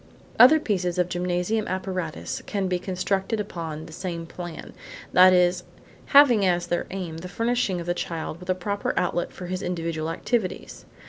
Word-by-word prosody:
Other 260 Hz, +7 st, +9 dB
pieces 185 Hz, -, -1 dB
of 180 Hz, -1 st, +1 dB
gymnasium 180 Hz, +5 st, -1 dB
apparatus 185 Hz, -3 st, -4 dB
can 200 Hz, -2 st, -1 dB
be 180 Hz, -1 st, 0 dB
constructed 190 Hz, +3 st, -1 dB
upon 165 Hz, -6 st, -5 dB
the 160 Hz, -, -12 dB
same 170 Hz, -1 st, -5 dB
plan, 175 Hz, -1 st, -8 dB, 0.4 s
that 185 Hz, +1 st, +8 dB
is, 180 Hz, 0 st, +3 dB, 0.4 s
having 265 Hz, -7 st, +6 dB
as 175 Hz, -2 st, +2 dB
their 175 Hz, -, -2 dB
aim 175 Hz, -4 st, -5 dB
the 180 Hz, -, -7 dB
furnishing 230 Hz, -3 st, 0 dB
of 170 Hz, -, -6 dB
the 175 Hz, -, 0 dB
child 165 Hz, -2 st, -4 dB
with 180 Hz, 0 st, -12 dB
a 185 Hz, -, +2 dB
proper 200 Hz, +2 st, -2 dB
outlet 175 Hz, -1 st, 0 dB
for 180 Hz, -, -8 dB
his 185 Hz, +1 st, -3 dB
individual 165 Hz, -2 st, -3 dB
activities. 185 Hz, -, -3 dB
180 Hz, 170 wpm, -25 LUFS, 175-195 Hz, 0.4 s, Other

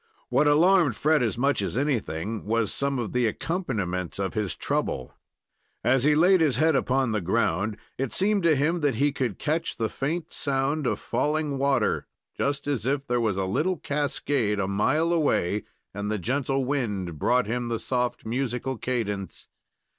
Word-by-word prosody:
What 150 Hz, -, +3 dB
alarmed 160 Hz, -, +4 dB
Fred 155 Hz, +2 st, +2 dB
as 115 Hz, -2 st, 0 dB
much 140 Hz, -1 st, +1 dB
as 100 Hz, -, -2 dB
anything 115 Hz, -, -1 dB
was 110 Hz, -1 st, 0 dB
some 140 Hz, -1 st, -1 dB
of 120 Hz, -3 st, -3 dB
the 125 Hz, -2 st, +2 dB
accompaniments 105 Hz, -, -2 dB
of 95 Hz, -1 st, -2 dB
his 105 Hz, -5 st, -2 dB
trouble. 65 Hz, -, -2 dB, 0.7 s
As 125 Hz, +2 st, +3 dB
he 150 Hz, +1 st, +4 dB
laid 180 Hz, +3 st, +5 dB
his 150 Hz, -5 st, +3 dB
head 160 Hz, -1 st, +3 dB
upon 130 Hz, -2 st, +1 dB
the 105 Hz, -1 st, 0 dB
ground, 100 Hz, +2 st, 0 dB, 0.2 s
it 135 Hz, -2 st, -1 dB
seemed 205 Hz, +1 st, +2 dB
to 165 Hz, -3 st, +4 dB
him 155 Hz, +5 st, +1 dB
that 145 Hz, -6 st, +1 dB
he 145 Hz, +5 st, +2 dB
could 125 Hz, -7 st, -2 dB
catch 160 Hz, +2 st, -1 dB
the 110 Hz, -1 st, -1 dB
faint 160 Hz, +8 st, -3 dB
sound 140 Hz, +1 st, 0 dB
of -, -, 0 dB
falling 150 Hz, -2 st, -1 dB
water, 140 Hz, 0 st, +1 dB, 0.3 s
just 140 Hz, 0 st, -1 dB
as 130 Hz, -6 st, -1 dB
if 140 Hz, 0 st, 0 dB
there 120 Hz, -2 st, 0 dB
was 105 Hz, -4 st, 0 dB
a 95 Hz, -, 0 dB
little 165 Hz, -, 0 dB
cascade 140 Hz, -7 st, -1 dB
a 95 Hz, -, 0 dB
mile 150 Hz, -, +1 dB
away, 105 Hz, -, +1 dB, 0.3 s
and 100 Hz, +1 st, -3 dB
the 110 Hz, -, 0 dB
gentle 135 Hz, +5 st, -1 dB
wind 105 Hz, -, -2 dB
brought 125 Hz, +7 st, +2 dB
him 120 Hz, +3 st, -2 dB
the 115 Hz, -1 st, -1 dB
soft, 125 Hz, 0 st, -2 dB
musical 125 Hz, +1 st, -2 dB
cadence. 105 Hz, -7 st, -3 dB
130 Hz, 175 wpm, -26 LUFS, 110-145 Hz, 0.7 s, laid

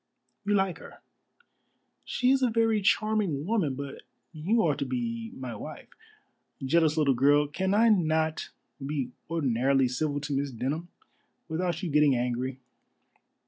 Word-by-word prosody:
"You 205 Hz, 0 st, +2 dB
like 195 Hz, -2 st, 0 dB
her." -, -, -13 dB, 1.0 s
"She 250 Hz, +1 st, +1 dB
is 270 Hz, 0 st, +3 dB
a 255 Hz, -, +3 dB
very 225 Hz, -1 st, +2 dB
charming 205 Hz, -7 st, +1 dB
woman, 185 Hz, -10 st, 0 dB
but 140 Hz, 0 st, -7 dB, 0.3 s
you 190 Hz, +9 st, +1 dB
are 155 Hz, -4 st, +3 dB
to -, -, -1 dB
be 230 Hz, -, -3 dB
my 125 Hz, -3 st, -6 dB
wife. -, -, -9 dB, 0.8 s
Jealous 160 Hz, +2 st, +3 dB
little 145 Hz, -3 st, +4 dB
girl, 145 Hz, +4 st, +4 dB
can 190 Hz, +7 st, -1 dB
I 230 Hz, +2 st, +5 dB
not 160 Hz, -5 st, +1 dB, 0.3 s
be 135 Hz, -3 st, -3 dB, 0.2 s
ordinarily 135 Hz, -4 st, +2 dB
civil 145 Hz, +3 st, -1 dB
to 145 Hz, 0 st, -3 dB
Miss 140 Hz, +1 st, 0 dB
Denham 135 Hz, +7 st, -3 dB, 0.6 s
without 170 Hz, +2 st, -2 dB
you 175 Hz, -, -2 dB
getting 150 Hz, -2 st, +4 dB
angry?" 125 Hz, +2 st, -2 dB
155 Hz, 140 wpm, -28 LUFS, 135-200 Hz, 1.0 s, I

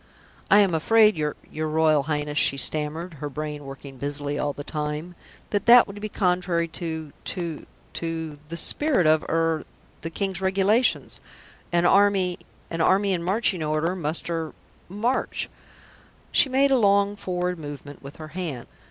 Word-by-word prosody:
"I 205 Hz, +1 st, +7 dB
am 195 Hz, -4 st, +2 dB
afraid, 215 Hz, +6 st, +4 dB
your 150 Hz, -2 st, -2 dB, 0.2 s
your 155 Hz, 0 st, -3 dB
Royal 155 Hz, -1 st, +3 dB
Highness," 150 Hz, 0 st, -2 dB
she 140 Hz, -, +3 dB
stammered, 155 Hz, +5 st, +1 dB
her 145 Hz, -, -3 dB
brain 150 Hz, 0 st, -5 dB
working 135 Hz, 0 st, -10 dB
busily 145 Hz, 0 st, -3 dB
all 145 Hz, -, 0 dB
the 145 Hz, -, -8 dB
time, 150 Hz, +3 st, -4 dB, 0.4 s
"that 205 Hz, +1 st, -1 dB
that 240 Hz, 0 st, +9 dB
would 205 Hz, +1 st, -10 dB
be 215 Hz, -, -4 dB
contrary 180 Hz, -3 st, 0 dB
to 160 Hz, -3 st, -6 dB
to 170 Hz, -4 st, -4 dB, 0.3 s
to 160 Hz, -3 st, -4 dB
the 170 Hz, +2 st, -5 dB
spirit 285 Hz, -, +3 dB
of 155 Hz, 0 st, +4 dB
er 165 Hz, -1 st, +1 dB, 0.4 s
the 165 Hz, -, -4 dB
King's 190 Hz, +2 st, -2 dB
Regulations. 195 Hz, +5 st, +2 dB, 0.5 s
An 175 Hz, 0 st, +2 dB
army 195 Hz, -1 st, +3 dB, 0.3 s
an 165 Hz, 0 st, -2 dB
army 195 Hz, +3 st, +3 dB
in 175 Hz, -, -1 dB
marching 190 Hz, 0 st, 0 dB
order 155 Hz, +3 st, 0 dB
must 160 Hz, -2 st, -2 dB
er 165 Hz, -2 st, -3 dB, 0.4 s
march." 225 Hz, +7 st, -2 dB, 0.8 s
She 275 Hz, -, +4 dB
made 275 Hz, +2 st, +3 dB
a 265 Hz, -, +4 dB
long 200 Hz, -1 st, +3 dB
forward 180 Hz, -2 st, -3 dB
movement 145 Hz, -1 st, -9 dB
with 140 Hz, +1 st, -10 dB
her 155 Hz, -1 st, -9 dB
hand. 155 Hz, -7 st, -5 dB
165 Hz, 160 wpm, -25 LUFS, 150-195 Hz, 0.8 s, that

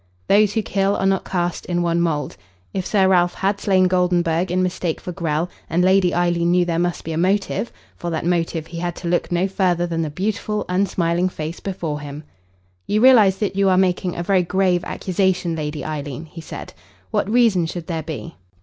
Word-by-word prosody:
Those 205 Hz, 0 st, +4 dB
who 220 Hz, -, +1 dB
kill 195 Hz, 0 st, +1 dB
are -, -, -1 dB
not 195 Hz, -1 st, +1 dB
cast 175 Hz, -2 st, -2 dB
in 175 Hz, -1 st, 0 dB
one 170 Hz, 0 st, +1 dB
mould. 150 Hz, -5 st, -1 dB, 0.4 s
If 190 Hz, -2 st, -2 dB
Sir 195 Hz, -3 st, +3 dB
Ralph 175 Hz, -2 st, +3 dB
had 195 Hz, +1 st, 0 dB
slain 185 Hz, -2 st, +3 dB
Goldenburg 180 Hz, -1 st, +1 dB
in 185 Hz, +1 st, +1 dB
mistake 180 Hz, -2 st, -2 dB
for 180 Hz, -, -6 dB
Grell, 165 Hz, -2 st, -1 dB, 0.2 s
and 175 Hz, +3 st, +2 dB
Lady 185 Hz, -1 st, +4 dB
Eileen 175 Hz, -1 st, +1 dB
knew 180 Hz, 0 st, +3 dB
there 170 Hz, -1 st, -1 dB
must 175 Hz, 0 st, -1 dB
be 165 Hz, -, -5 dB
a 160 Hz, -, -2 dB
motive 195 Hz, +5 st, 0 dB, 0.3 s
for 175 Hz, -, -4 dB
that 160 Hz, -1 st, -3 dB
motive 165 Hz, -2 st, 0 dB
he 170 Hz, 0 st, -7 dB
had 175 Hz, 0 st, -3 dB
to 175 Hz, -, -6 dB
look 175 Hz, +1 st, 0 dB
no 175 Hz, +2 st, +1 dB
further 180 Hz, -3 st, +1 dB
than 165 Hz, -1 st, -2 dB
the 160 Hz, -, -2 dB
beautiful, 210 Hz, +5 st, -2 dB
unsmiling 180 Hz, -1 st, +1 dB
face 160 Hz, -1 st, -6 dB
before 170 Hz, -6 st, -4 dB
him. 145 Hz, +1 st, -8 dB, 0.6 s
"You 210 Hz, -, +1 dB
realise 220 Hz, -6 st, +6 dB
that 200 Hz, -2 st, -2 dB
you 195 Hz, 0 st, +3 dB
are 185 Hz, -, +3 dB
making 180 Hz, -1 st, +1 dB
a 175 Hz, -, -3 dB
very 190 Hz, +1 st, +3 dB
grave 180 Hz, 0 st, +1 dB
accusation, 185 Hz, -2 st, 0 dB
Lady 150 Hz, -2 st, -4 dB
Eileen?" 150 Hz, -1 st, -5 dB
he 165 Hz, +1 st, -10 dB
said. -, -, -8 dB, 0.4 s
"What -, -, 0 dB
reason 220 Hz, -7 st, +3 dB
should 170 Hz, 0 st, -6 dB
there 165 Hz, -2 st, -3 dB
be?" 160 Hz, +1 st, -7 dB
175 Hz, 205 wpm, -21 LUFS, 165-190 Hz, 0.6 s, realise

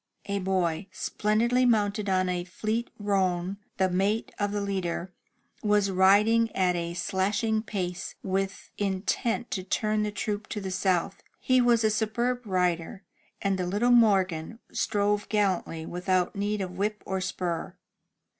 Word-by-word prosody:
A 200 Hz, 0 st, -1 dB
boy, 185 Hz, -2 st, 0 dB
splendidly 220 Hz, +6 st, +1 dB
mounted 210 Hz, -3 st, +2 dB
on 185 Hz, -1 st, +2 dB
a 180 Hz, -1 st, -1 dB
fleet 215 Hz, +6 st, -2 dB
roan, 190 Hz, -2 st, 0 dB, 0.2 s
the 190 Hz, -, +3 dB
mate 195 Hz, +5 st, 0 dB
of 205 Hz, -1 st, 0 dB
the 205 Hz, -, -1 dB
leader, 190 Hz, -2 st, -3 dB, 0.5 s
was 205 Hz, -2 st, +2 dB
riding 210 Hz, +5 st, +4 dB
at 180 Hz, -2 st, +2 dB
a 170 Hz, 0 st, -3 dB
slashing 200 Hz, +4 st, 0 dB
pace, 180 Hz, -4 st, -4 dB
with 195 Hz, 0 st, -2 dB
intent 205 Hz, +4 st, -1 dB
to 185 Hz, -, -2 dB
turn 215 Hz, +3 st, 0 dB
the 210 Hz, -, 0 dB
troop 210 Hz, 0 st, -3 dB
to 210 Hz, -, -4 dB
the 190 Hz, -2 st, -4 dB
south. 185 Hz, 0 st, 0 dB, 0.2 s
He 255 Hz, -1 st, +3 dB
was 240 Hz, -2 st, +4 dB
a 215 Hz, -, +3 dB
superb 235 Hz, +3 st, -1 dB
rider, 180 Hz, 0 st, 0 dB, 0.4 s
and 195 Hz, -1 st, +1 dB
the 180 Hz, -, -1 dB
little 210 Hz, +7 st, +2 dB
Morgan 195 Hz, -5 st, +3 dB
strove 205 Hz, 0 st, 0 dB
gallantly 190 Hz, -6 st, 0 dB
without 180 Hz, +2 st, 0 dB
need 205 Hz, +1 st, -1 dB
of 185 Hz, -2 st, -3 dB
whip 210 Hz, +1 st, -1 dB
or 190 Hz, 0 st, -2 dB
spur. 175 Hz, -3 st, -3 dB
200 Hz, 145 wpm, -27 LUFS, 185-215 Hz, 0.5 s, riding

